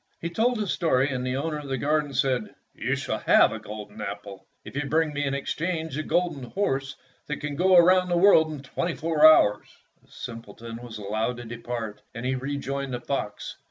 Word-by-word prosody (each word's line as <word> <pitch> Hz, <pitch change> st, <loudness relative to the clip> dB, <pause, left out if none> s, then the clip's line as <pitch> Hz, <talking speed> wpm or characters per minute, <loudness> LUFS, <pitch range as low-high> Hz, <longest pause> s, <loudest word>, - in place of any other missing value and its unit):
He 170 Hz, -, -4 dB
told 235 Hz, +6 st, +1 dB
his 210 Hz, -4 st, -1 dB
story, 140 Hz, -5 st, +2 dB
and 125 Hz, -1 st, -2 dB
the 130 Hz, 0 st, -1 dB
owner 150 Hz, +1 st, -2 dB
of 145 Hz, -, -8 dB
the 135 Hz, -1 st, -2 dB
garden 150 Hz, +2 st, 0 dB
said, 130 Hz, -5 st, 0 dB, 0.2 s
"You -, -, -1 dB
shall -, -, -3 dB
have -, -, +5 dB
a -, -, -5 dB
golden 105 Hz, 0 st, -9 dB
apple 100 Hz, -2 st, -7 dB, 0.2 s
if -, -, -10 dB
you 145 Hz, -, 0 dB
will 145 Hz, -, -5 dB
bring 160 Hz, -1 st, +1 dB
me 145 Hz, 0 st, -1 dB
in 135 Hz, 0 st, -1 dB
exchange 160 Hz, +3 st, -3 dB
the 155 Hz, -, -2 dB
golden 170 Hz, -3 st, 0 dB
horse 135 Hz, -2 st, -2 dB, 0.3 s
that 150 Hz, -, -3 dB
can 145 Hz, -1 st, -4 dB
go 185 Hz, +4 st, +4 dB
around 180 Hz, +1 st, +6 dB
the 175 Hz, -, +2 dB
world 170 Hz, -4 st, +6 dB
in 145 Hz, -3 st, -7 dB
twenty 170 Hz, +5 st, -3 dB
four 160 Hz, -1 st, 0 dB
hours." 105 Hz, -9 st, +3 dB, 0.4 s
The -, -, -28 dB
simpleton 115 Hz, -1 st, -8 dB
was 120 Hz, -2 st, -8 dB
allowed 110 Hz, +4 st, -2 dB
to 120 Hz, -, -8 dB
depart, 115 Hz, -2 st, -5 dB
and 115 Hz, +1 st, -5 dB
he 130 Hz, -, +1 dB
rejoined 140 Hz, 0 st, -3 dB
the -, -, -4 dB
fox. 120 Hz, -5 st, -4 dB
140 Hz, 210 wpm, -26 LUFS, 120-160 Hz, 0.4 s, around